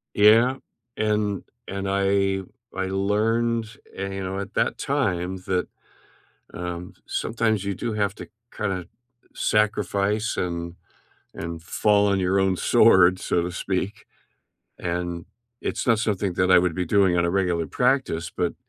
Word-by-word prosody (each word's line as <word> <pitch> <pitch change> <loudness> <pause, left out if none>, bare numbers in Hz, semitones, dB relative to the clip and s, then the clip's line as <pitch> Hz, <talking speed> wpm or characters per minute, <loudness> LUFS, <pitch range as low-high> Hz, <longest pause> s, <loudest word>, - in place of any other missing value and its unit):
Yeah, 115 +5 +6 0.4
and 105 -2 0 0.2
and 100 0 -4
I 100 0 +1 0.3
I 95 0 -1
learned, 110 +4 +1 0.3
eh, 100 0 -3
you 95 0 -4
know, 95 +1 -3
at 100 -1 -6
that - - +1
time 90 +1 -1
that, 90 -1 0 0.9
um, 90 0 -5
sometimes 110 -3 0
you 100 0 -2
do 115 +4 -3
have 100 -2 0
to - - -9 0.3
kinda 95 -4 -2 0.5
sacrifice 105 0 0
and 85 -1 -3 0.6
and 85 0 -6
fall 105 +3 +2
on 100 -1 +2
your 95 +1 +2
own 95 -1 +2
sword, 95 -6 +5
so 85 - 0
to 90 +1 -3
speak. 100 +3 -3 0.7
And 85 -1 -3 0.3
it's - - -3
not 115 -3 +4
something 100 -4 -1
that 90 +1 +2
I 90 - +8
would 90 -2 +1
be 90 - -1
doing 95 0 +3
on 85 - +2
a 85 - +1
regular 90 -3 0
practice, 125 - 0
but, - - -2
95 Hz, 145 wpm, -24 LUFS, 90-105 Hz, 0.9 s, I